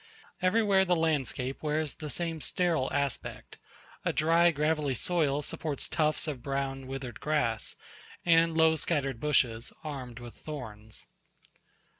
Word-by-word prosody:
Everywhere 195 0 +4
the 180 -1 +2
landscape 140 -5 0
wears 155 -1 0
the 150 - -7
same 165 0 -1
sterile 165 -7 +1
aspect; 140 -2 -3 0.4
a - - +1
dry 165 +2 +4
gravelly 150 -3 +1
soil 150 -1 +1
supports 145 -1 -2
tufts 155 +1 +1
of 140 -5 -3
brown 135 0 -2
withered 135 -2 -6
grass, 145 -8 0 0.5
and 165 -1 +4
low 160 0 +6
scattered 140 -5 0
bushes, 120 -6 +1
armed 130 -6 -6
with 120 -1 -9
thorns. 110 -8 -6
150 Hz, 125 wpm, -30 LUFS, 135-160 Hz, 0.5 s, low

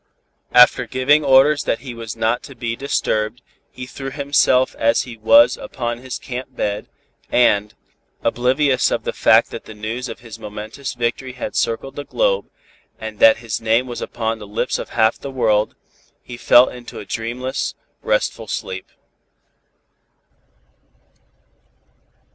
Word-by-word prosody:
After 125 0 +6
giving 140 +4 +3
orders 140 +2 +5
that 115 - -1
he 130 -2 -7
was 115 -2 -7
not 115 +2 0
to 135 - -12
be 115 -1 -3
disturbed, 120 -4 -1 0.3
he 125 - -8
threw 135 +1 -7
himself 140 -2 +2
as 115 +1 +3
he 120 -2 -9
was 285 - +5
upon 120 -2 -4
his 130 0 -6
camp 130 +1 -7
bed, 105 -2 -3 0.4
and, 105 -4 +3 0.5
oblivious 130 +2 +2
of - - -2
the - - -3
fact - - +4
that - - -8
the 110 - -11
news 115 +4 -5
of 115 - -8
his 115 -3 -11
momentous 110 +6 -7
victory 120 +2 -2
had 125 - -6
circled 135 +4 -1
the 145 - -5
globe - - 0 0.5
and 110 -1 -8
that 115 - +7
his 115 -1 -3
name 115 +3 +2
was 120 -2 -6
upon 115 -1 -3
the 105 - -10
lips 105 - -2
of - - -6
half 110 -1 +2
the 140 - -6
world, 110 -5 +1 0.5
he 120 - -9
fell 120 +1 +6
into 125 -1 -9
a - - -7
dreamless, 120 +5 -3 0.3
restful - - -1
sleep. 95 0 -5
120 Hz, 150 wpm, -20 LUFS, 115-130 Hz, 0.5 s, that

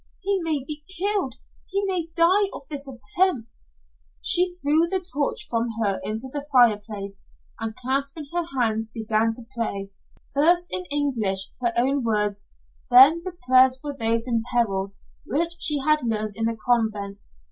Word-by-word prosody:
He 395 0 0
may 310 -5 -1
be 300 +1 -6
killed. 390 - 0 0.3
He 395 +1 -1
may 360 -4 -2
die 370 +4 +4
of - - -8
this 280 -1 -3
attempt." 245 - -1 0.5
She 360 +1 +3
threw 320 0 +2
the 380 +2 0
torch 300 -6 -2
from 230 0 -1
her 200 -3 0
into 220 +4 -4
the 290 -1 -3
fireplace, 210 -5 +1 0.3
and 225 -1 -4
clasping 275 +4 -2
her 345 -1 0
hands 225 -2 +1
began 220 0 0
to 230 0 -7
pray, 200 -4 -3 0.4
first 345 +5 +4
in 365 - -2
English 240 - +1
her 240 -1 +1
own 265 +2 +2
words, 210 -2 -1 0.4
then 270 +7 +8
the 365 -1 -7
prayers 260 0 +5
for 290 0 -6
those 230 -1 +1
in 230 -2 +1
peril 200 -5 0 0.3
which 335 +6 0
she 300 - +3
had 305 +2 +3
learned 215 -3 -2
in 225 - -1
the 230 0 -1
convent. 210 -4 0
255 Hz, 160 wpm, -24 LUFS, 220-310 Hz, 0.5 s, then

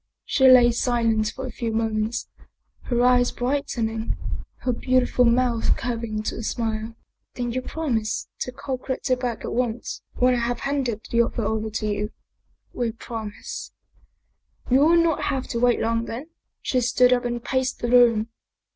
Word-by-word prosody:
She 265 -2 +4
lay 250 -2 +8
silent 230 -2 +1
for 265 +5 -6
a 255 - -5
few 230 0 -3
moments; 220 +1 -1 0.6
her 240 -1 +1
eyes 250 -1 +4
brightening, 235 -4 -2 0.4
her 250 - 0
beautiful 255 0 +2
mouth 235 -1 +2
curving 230 -3 -3
to - - -3
a - - -4
smile. 225 -1 -3 0.2
" - - -54
Then 245 -1 -2
you 255 +2 -2
prom 270 -3 -1
ise 215 0 -3
to 250 - -3
call 260 0 -4
Gritti 260 0 -1
back 250 -3 -2
at - - -4
once, 240 -1 -2
when 250 0 +3
I 245 - +1
have 235 +1 -2
handed 265 -6 -1
the 235 - +4
other 235 -1 -1
over 220 0 -1
to 215 0 -3
you? 210 0 -1 0.2
" - - -49
" - - -43
We 235 -2 -1
promise." 220 -2 -7 0.5
" - - -21
You 260 - +6
will 325 +4 +5
not 330 -2 +1
have 265 -1 -1
to 235 - -2
wait 245 0 +3
long 230 0 0
then." 255 +9 -6 0.3
She 255 - +1
stood 250 +1 +4
up 245 - +1
and 240 -1 -3
paced 260 -1 -1
the 240 - -2
room. 235 -3 +5
240 Hz, 180 wpm, -24 LUFS, 225-255 Hz, 0.6 s, lay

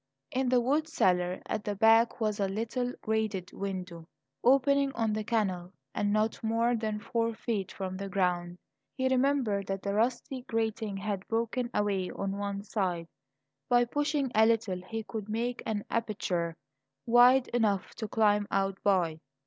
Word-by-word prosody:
In 260 -2 0
the 250 0 +4
wood 290 +6 +1
cellar 180 - +1
at 215 - -3
the 205 - -2
back 225 +3 +4
was 215 -2 0
a 200 - +2
little 230 +5 -2
grated 215 -4 -1
window, 180 -4 -5 0.4
opening 275 +2 +4
on 225 -2 0
the 215 0 -2
canal 195 -5 -1 0.2
and 205 0 0
not 215 +2 0
more 230 +2 +2
than 215 -2 -2
four 230 +1 -1
feet 205 -5 -3
from 185 -1 -5
the 195 0 -5
ground. 180 -3 0 0.4
He 260 -1 0
remembered 255 -7 +1
that 195 0 -3
the 200 - -1
rusty 245 +4 0
grating 220 -2 -1
had 195 -1 -3
broken 235 +2 -1
away 200 -4 0
on 195 0 -3
one 200 0 -3
side; 180 -5 -2 0.6
by 245 -1 +5
pushing 290 0 -1
a 220 +1 +5
little 215 -5 0
he 225 -1 -4
could 215 -1 -6
make 235 +3 -2
an 210 -2 -2
aperture 195 -7 -2 0.5
wide 245 +2 +6
enough 215 -5 0
to 220 - -3
climb 210 -1 +2
out 195 0 0
by. 175 -5 +2
215 Hz, 160 wpm, -30 LUFS, 195-235 Hz, 0.6 s, wide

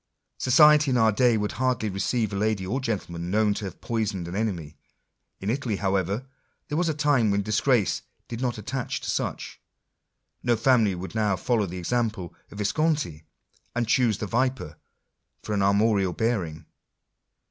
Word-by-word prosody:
Society 150 +2 +6
in 125 - +2
our 110 -1 +4
day 120 +2 +3
would 105 0 -1
hardly 125 -3 0
receive 105 +3 -1
a - - -2
lady 105 -1 0
or 130 +9 -2
gentle 110 -8 -3
man 85 +1 -5
known 105 +1 +2
to 100 - -5
have 95 -3 -8
poisoned 105 -6 -2
an 85 - -6
enemy: 90 -8 -3 0.6
in 100 +3 -1
Italy, 125 -4 -1
however, 100 +4 -1 0.4
there 150 - -1
was 175 -2 +1
a 155 - -1
time 145 -7 +2
when 100 0 +1
disgrace 110 +1 +1 0.3
did 115 0 -6
not 125 -3 -1
attach 125 +4 -4
to - - -2
such. - - -4 0.8
No 120 -1 +2
family 115 -4 +3
would 90 +2 -7
now 105 -3 +1
follow 105 +2 0
the 90 +1 -6
example 105 -2 -2
of - - -42
the - - -13
Visconti, 105 - -1 0.5
and 120 -1 0
choose 115 -3 +3
the - - -3
viper 125 - -1 0.7
for 105 - -3
an 100 - +1
armorial 100 -1 +2
bearing. 90 -10 -2
110 Hz, 170 wpm, -26 LUFS, 95-125 Hz, 0.8 s, Society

